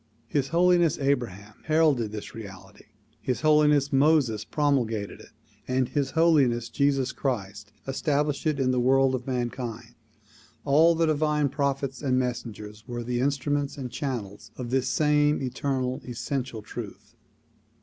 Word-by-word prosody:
His 135 +1 0
Holiness 175 0 +3
Abraham 115 -7 -2
heralded 155 -9 +2
this 105 -1 -7
reality. 95 -4 -11 0.4
His 125 - -2
Holiness 150 -2 +4
Moses 135 -6 +3
promulgated 120 -9 -1
it - - -15 0.4
and 130 0 0
His 140 -2 -1
Holiness 135 -8 +3
Jesus 140 -2 +1
Christ 105 -6 -4 0.2
established 145 +2 0
it 150 -2 0
in 130 -1 +2
the 125 - +1
world 135 +1 +3
of 125 0 -4
mankind. 120 -2 -4 0.7
All 160 +4 +5
the 165 0 +2
divine 150 -1 +1
prophets 140 -1 -2
and 130 -3 +1
messengers 115 -4 -4
were 120 -1 -4
the 120 +1 -2
instruments 140 +2 -1
and 130 -3 -5
channels 115 -9 -5
of 125 -2 -5
this 130 -1 +1
same 150 0 +2
eternal, 130 0 -2
essential 125 -2 -4
truth. - - -9
130 Hz, 135 wpm, -26 LUFS, 120-145 Hz, 0.7 s, All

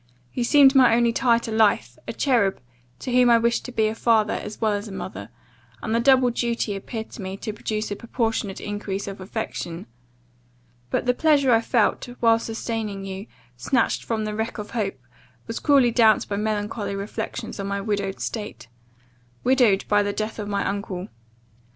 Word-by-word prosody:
You 245 - -1
seemed 275 +2 +6
my 255 -4 +6
only 235 -1 +3
tie 235 -1 +3
to 230 -1 -5
life, 220 -1 +2
a - - -3
cherub, 230 -9 +1 0.4
to 255 - -5
whom 250 0 +5
I 235 - +7
wished 235 +1 +1
to 250 - -6
be 220 -2 +1
a 215 - 0
father, 225 -2 +2
as 210 0 -6
well 220 -1 +2
as 205 +2 -3
a - - -8
mother; 100 - -7 0.5
and 220 - -2
the 230 - +3
double 255 0 +4
duty 235 -3 -1
appeared 220 +3 -6
to - - -9
me 190 0 -5
to 215 - -5
produce 215 0 -3
a - - -1
proportionate 225 -3 -2
increase 205 -1 -4
of 195 -1 -7
affection. 185 -4 -5 1.0
But - - -1
the 250 - +3
pleasure 280 -1 +3
I 225 - +4
felt, 230 -1 +1
while 230 -1 +4
sustaining 220 -3 -4
you, 195 +2 -6 0.3
snatched 230 - 0
from 220 -2 -2
the 210 - -3
wreck 220 +3 -3
of 210 -1 -7
hope, 210 - -2 0.5
was 225 - -4
cruelly 275 -5 +4
damped 225 -2 +4
by 200 - -2
melancholy 210 -1 -2
reflections 200 +1 -5
on 195 - -3
my 200 0 -2
widowed 200 -1 -2
state 210 - -5 0.7
widowed 245 -6 +3
by 205 0 +4
the 205 0 -1
death 215 +1 -4
of 205 - -4
my 200 -1 -1
uncle. 195 -1 -4
220 Hz, 185 wpm, -24 LUFS, 200-235 Hz, 1.0 s, I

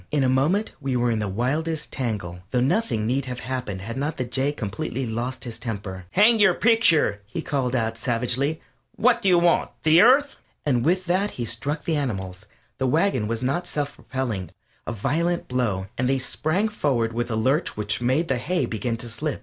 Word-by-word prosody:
In 145 -2 +1
a 130 - +3
moment 155 +12 +1
we 135 -2 -1
were 120 -1 +2
in 110 - 0
the 105 - -1
wildest 150 +10 -1
tangle, 105 -9 -3
though 125 - +1
nothing 130 - +1
need 130 +4 0
have 125 -1 -5
happened 125 -7 -4
had 115 +5 -6
not 150 +3 -2
the 130 - -1
Jay 135 +3 0
completely 115 +1 -4
lost 120 +3 -3
his 120 -3 -5
temper. 100 -5 -5
"Hang 220 +3 +5
your 190 -4 +5
picture!" 170 - +3
he 160 +9 -5
called 130 -3 -1
out, 115 -2 -1
savagely, 125 +5 0 0.4
"What 240 0 +3
do 195 - +3
you 180 - +6
want? 170 0 +3
The 160 +2 +6
Earth?" 275 +5 +5 0.3
And 125 -5 +2
with 185 +4 +1
that 185 +4 +1
he 120 - -2
struck 130 +7 -2
the 160 -2 +1
animals 95 -7 -4 0.3
the 130 - +1
wagon 130 - +2
was 115 +2 -2
not 155 +8 -1
self 145 -3 -2
propelling 115 -10 -4 0.4
a - - -1
violent 160 - -1
blow, 115 -7 -1
and 125 0 +1
they 135 - +2
sprang 155 +9 0
forward 130 - 0
with 120 +1 -2
a 115 - -1
lurch 130 +8 +1
which 105 +2 -2
made 130 +7 +1
the 130 -4 0
hay 180 +7 0
begin 115 +1 -2
to 120 - -5
slip. 140 +6 -3
130 Hz, 200 wpm, -24 LUFS, 115-160 Hz, 0.4 s, you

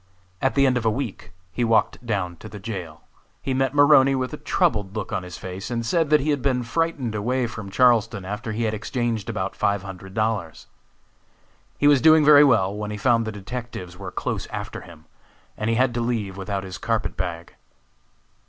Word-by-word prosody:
At 135 - +1
the 140 -1 +4
end 130 -2 +3
of 120 - -3
a - - +5
week 120 0 -4 0.2
he 120 - -1
walked 115 +1 +2
down 95 -7 -2
to 110 - -10
the 105 - -9
jail. 95 -6 -7 0.4
He 135 - -3
met 135 +1 0
Maroney 145 -2 +6
with 130 +2 -2
a - - -4
troubled 105 -8 0
look 110 - -4
on - - -1
his 90 -1 -9
face, 95 +1 -7
and 115 -1 -2
said 165 +3 +1
that 150 -1 +5
he 150 +2 0
had 145 -2 0
been 125 -2 +1
frightened 145 -2 -1
away 120 +5 0
from 105 -4 -7
Charleston 115 -3 +3
after 105 +4 -4
he 110 +2 -2
had 110 -1 0
exchanged 115 -1 -2
about 95 +1 -3
five 100 -1 0
hundred 95 0 -9
dollars. 110 -7 -2 1.1
He - - 0
was 145 -3 +6
doing 155 -1 +6
very 145 -1 +8
well 105 -8 +3
when 105 0 -4
he 105 - -4
found 115 +1 +2
the - - -2
detectives 105 -3 -7
were 95 0 -7
close - - -3
after - - -6
him, 85 -3 -14 0.5
and 110 - -2
he 115 - +2
had 125 0 +2
to 120 - -1
leave 115 -5 -2
without 95 0 -4
his 95 -3 -7
carpet 115 +1 -1
bag. 85 -2 -5
115 Hz, 205 wpm, -23 LUFS, 100-130 Hz, 1.1 s, very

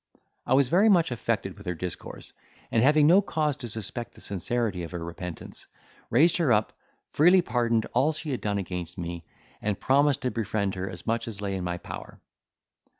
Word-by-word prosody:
I 130 - +4
was 140 -1 +4
very 195 - +4
much 175 -8 +4
affected 110 -5 -2
with 100 -2 -13
her 90 - -1
discourse 90 +1 -7 0.4
and, 115 - +3
having 150 +3 +5
no 180 +6 +7
cause 155 -7 0
to 120 - -6
suspect 110 +2 -5
the - - -15
sincerity 100 0 -2
of 85 - -5
her 85 -1 -4
repentance, 85 0 -8 0.4
raised 155 +9 +5
her 160 -8 +2
up, 105 -1 +2 0.4
freely 180 +4 +5
pardoned 115 -6 +1
all 135 +6 +3
she 155 -1 -5
had 130 - -3
done 105 -1 -1
against 90 -2 -5
me, 85 -2 -5 0.4
and 105 -2 -1
promised 140 +1 +3
to 125 - 0
befriend 105 -3 -1
her 95 0 -4
as 90 -2 -9
much 115 0 -1
as 110 -4 -6
lay 100 -1 -3
in 95 - -3
my 90 0 -2
power. - - -9
115 Hz, 195 wpm, -27 LUFS, 95-140 Hz, 0.4 s, no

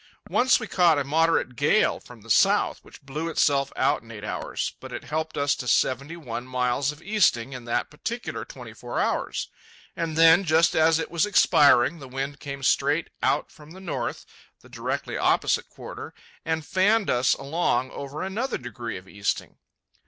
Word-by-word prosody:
Once 255 +1 +4
we 235 - -5
caught 175 -6 +3
a 145 - +1
moderate 160 -2 +1
gale 145 - +2
from 120 -3 -15
the 115 - -16
south, - - +3
which - - -16
blew 150 +5 -4
itself 140 -3 +2
out - - +1
in 115 - -18
eight 105 -3 -9
hours, 105 - -3
but - - -10
it - - -6
helped 160 +1 -3
us 140 0 +2
to 125 - -6
seventy 140 +7 +1
one 120 -7 -6
miles 125 +2 0
of 150 +2 -14
easting 170 - +2
in 125 -2 -8
that 120 - -1
particular 235 +11 -5
twenty - - -11
four - - -5
hours. - - -1 0.5
And 165 -2 -3
then, 165 +3 +7
just 160 -1 +3
as 160 0 +4
it 165 - -4
was 170 +4 +1
expiring, 150 -6 +4
the 135 - -10
wind 135 +2 -5
came 140 -1 -7
straight - - +1
out - - 0
from 150 +1 -15
the 190 - -11
north 135 -11 -4 0.4
(the - - -18
directly - - -4
opposite - - +1
quarter), - - -9 0.3
and 160 -1 -2
fanned 200 +3 +2
us 125 +1 +3
along 140 -3 -1
over 140 +4 -6
another 215 +8 -2
degree 120 -3 -6
of 90 +1 -13
easting. 100 +1 -3
145 Hz, 180 wpm, -25 LUFS, 130-165 Hz, 0.5 s, then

